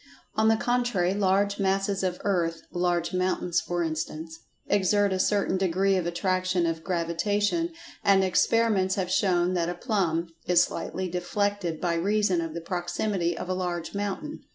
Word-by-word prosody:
On 220 0 +2
the 225 0 +4
contrary, 240 -7 +1
large 200 +1 +1
masses 195 0 +1
of 180 -2 -2
earth—large 175 -1 -1
mountains, 185 -1 0
for 175 0 -2
instance—exert 165 +5 -1
a 185 - -1
certain 200 -1 +1
degree 190 +1 +2
of 180 -2 0
Attraction 185 0 0
of 165 -1 -2
Gravitation, 205 - 0 0.3
and 195 -1 +5
experiments 190 0 +2
have 185 -2 -2
shown 180 -2 +2
that 170 -1 0
a 175 - -3
"plumb" 175 -6 -1 0.2
is 175 0 +5
slightly 185 +1 -4
deflected 180 -1 -1
by 175 -2 0
reason 190 +1 +1
of 165 -1 -5
the 170 - -4
proximity 175 0 -2
of - - -5
a 185 - -1
large 175 -2 -3
mountain. 205 +10 -4
185 Hz, 150 wpm, -27 LUFS, 175-200 Hz, 0.3 s, and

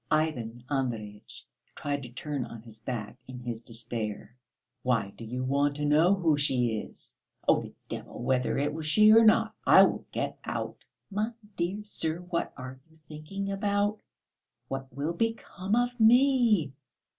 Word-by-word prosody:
Ivan 120 -7 0
Andreyitch 115 -7 -4 0.3
tried 145 -1 -2
to 125 - -8
turn 140 +2 -4
on 115 -2 -9
his 110 -2 -13
back 115 0 -5
in 130 -1 -8
his 120 -2 -5
despair. 115 -1 -5 0.5
"Why 115 -6 +1
do - - -10
you 125 +3 -4
want 140 +2 +1
to 150 0 -2
know 160 +6 +5
who 165 -6 +2
she 125 -5 +2
is? - - -11 0.3
Oh, - - +5
the - - -10
devil - - -7
whether 125 0 +1
it 145 +2 0
was 155 0 -4
she 215 +8 +7
or 225 +1 +8
not, 215 - +4
I - - +8
will - - 0
get - - -3
out." - - -5 0.3
"My 215 +4 -1 0.2
dear 185 +5 -2
sir! 160 -6 -1
What 175 -1 -2
are 130 0 -8
you 160 - -23
thinking 195 +6 -5
about? 205 +1 0 0.7
What 135 0 -5
will 145 +6 -2
become 210 -1 -1
of 245 +1 0
me?" 230 - +5
145 Hz, 160 wpm, -29 LUFS, 125-195 Hz, 0.7 s, or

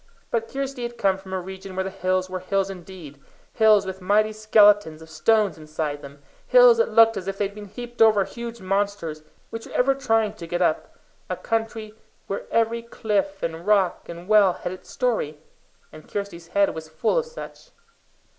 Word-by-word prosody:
But 225 -1 -1
Kirsty 275 -1 -4
had 240 0 -5
come 190 -1 +1
from 190 -1 -12
a 190 - -1
region 190 +1 -9
where 190 - 0
the 190 - -5
hills 185 0 -1
were 185 0 -5
hills 195 +1 -1
indeed 175 -6 -11 0.3
hills 215 -3 +5
with 190 0 -6
mighty 210 +3 +2
skeletons 205 -6 +4
of 160 0 -14
stone 215 +3 +2
inside 155 -1 -5
them; 140 0 -12 0.2
hills - - +7
that 470 +1 +2
looked 225 -1 +5
as 190 -1 -6
if 195 0 -3
they 205 - +1
had 200 - -6
been 205 0 -9
heaped 240 +3 -8
over 215 -3 +6
huge 235 -1 -8
monsters 195 -5 -2 0.3
which 225 0 -7
were - - -12
ever 270 +2 +3
trying 225 -6 +1
to 170 -6 -9
get 175 +1 -2
up - - 0 0.3
a - - -1
country 225 -1 -3 0.3
where 195 - -4
every 230 0 +1
cliff, 205 -4 -2
and 165 +2 -4
rock, 195 -4 +2
and 170 +1 -9
well 205 -3 +5
had 175 - -5
its 185 - -11
story 220 - -1 0.5
and 155 - -14
Kirsty's 200 -5 -5
head 200 0 +4
was 160 0 -8
full 160 - +1
of 480 - -4
such. 480 +1 -10
200 Hz, 195 wpm, -24 LUFS, 185-225 Hz, 0.5 s, hills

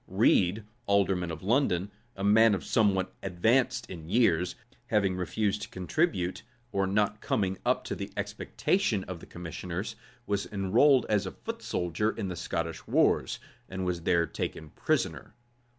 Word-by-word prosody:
Read, 95 +5 +3 0.2
alderman 95 -3 +2
of 80 0 -6
London,[*] 100 -4 +1 0.2
a 95 - -5
man 105 0 +5
somewhat 95 -2 +1
advanced 110 +8 +1
in 80 -3 -9
years, 90 -6 +2 0.3
having 100 -5 +2
refused 100 +3 -1
to - - -6
contribute, 95 - -1 0.3
or 100 -2 +1
not 105 +1 +1
coming 95 -1 0
up - - +1
to - - -4
the - - -5
expectation 125 - 0
of 90 -3 -7
the - - -13
commissioners, 90 +4 -5 0.3
was 100 -1 -1
enrolled 115 +7 +4
as 105 -2 +1
a - - -4
foot - - -7
soldier 90 +5 -1
in 100 - -3
the 90 - -4
Scottish 85 -1 -4
wars, - - +2 0.3
and 95 0 -4
was 90 -2 -1
there 85 0 +2
taken 80 -2 -5
prisoner. - - -1
95 Hz, 150 wpm, -29 LUFS, 90-105 Hz, 0.3 s, man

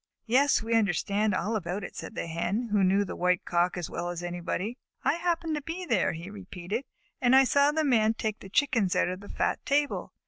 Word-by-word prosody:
"Yes, 260 +2 +3
we 230 +1 -2
understand 205 -1 +1
all 210 +5 -1
about 185 0 -3
it," - - -8
said - - -7
the - - -3
Hens, 175 +8 -2
who 205 -2 +3
knew 195 +2 +3
the - - -6
White 180 0 +1
Cock 175 +1 +1
as 175 - -3
well 175 - -4
as 175 0 -5
anybody. 175 +6 -3 0.2
"I - - +3
happened 335 -1 -1
to 300 - -2
be 335 +5 -5
there," 230 - +1
he 165 +2 -7
repeated, 195 +4 -5 0.4
"and 250 +1 +5
I 270 - +8
saw 280 +2 +4
the 315 +1 0
Man 225 -5 +3
take 215 -1 -3
the 195 - -11
Chickens 225 -6 +2
out - - +2
of 185 +1 -4
the 205 - -12
fat - - -1
table. 285 +1 0
210 Hz, 220 wpm, -28 LUFS, 180-265 Hz, 0.4 s, I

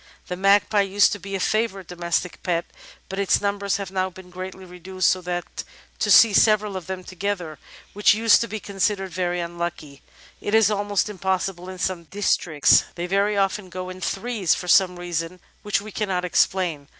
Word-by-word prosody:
The 180 - -2
Mag 195 +2 +4
pie 210 -2 +2
used 200 +1 +3
to 205 - -3
be 195 0 -6
a - - -2
favourite 215 -1 -1
domestic 175 0 -3
pet, 170 -2 -1 0.4
but 195 +1 -5
its 200 - +3
numbers 200 -1 -1
have 195 -2 -6
now 190 -1 -1
been 185 0 -14
greatly 185 +1 -8
reduced, 185 +1 -1
so 185 - -1
that 175 0 -5 0.4
to - - 0
see 225 -3 +7
several 210 -1 +3
of 185 -3 -6
them 185 -1 -5
together, 180 -5 -4 0.3
which 205 +1 +4
used 225 0 +5
to 235 - -1
be 215 0 -5
considered 195 -1 -2
very 180 -1 -1
unlucky, 170 -4 -5 0.4
is 215 0 +3
almost 205 -1 0
impossible 190 -2 -3
in 185 - -8
some 180 -2 -2
districts. 175 -5 +2
They 175 - -3
very 200 +3 +1
often 195 0 0
go 185 +1 -6
in 185 0 -10
threes, 200 -1 0
for 180 - -7
some 180 0 +4
reason 175 0 -4 0.2
which 205 -1 0
we 215 +1 -9
cannot 190 -4 -2
explain. 175 -5 0
190 Hz, 185 wpm, -23 LUFS, 180-200 Hz, 0.4 s, see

